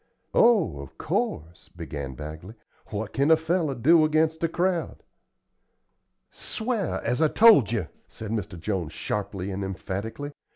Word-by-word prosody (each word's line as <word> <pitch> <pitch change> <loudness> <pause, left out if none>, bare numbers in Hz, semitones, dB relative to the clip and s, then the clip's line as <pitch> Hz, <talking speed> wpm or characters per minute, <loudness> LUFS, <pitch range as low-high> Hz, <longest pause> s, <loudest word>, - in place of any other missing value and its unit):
"Oh, 200 - +4
of 70 -1 -10
course," 80 +3 -3
began 70 -3 -7
Bagley. 80 - -8 0.3
"What 105 0 -5
kin 140 +1 +2
one 160 0 +6
feller 160 -3 0
do 160 +7 +5
against 155 +1 +1
a - - +4
crowd?" 175 0 -1 1.3
"Sw'ar, 220 -5 -3
as 125 +6 0
I 160 - +5
told 200 - +6
you," 105 -9 -1 0.2
said 110 -1 -8
Mr. 100 -6 -4
Jones, 85 -3 -3
sharply 100 -2 -4
and 95 +1 -3
emphatically. 100 +8 -5
115 Hz, 135 wpm, -26 LUFS, -, 1.3 s, one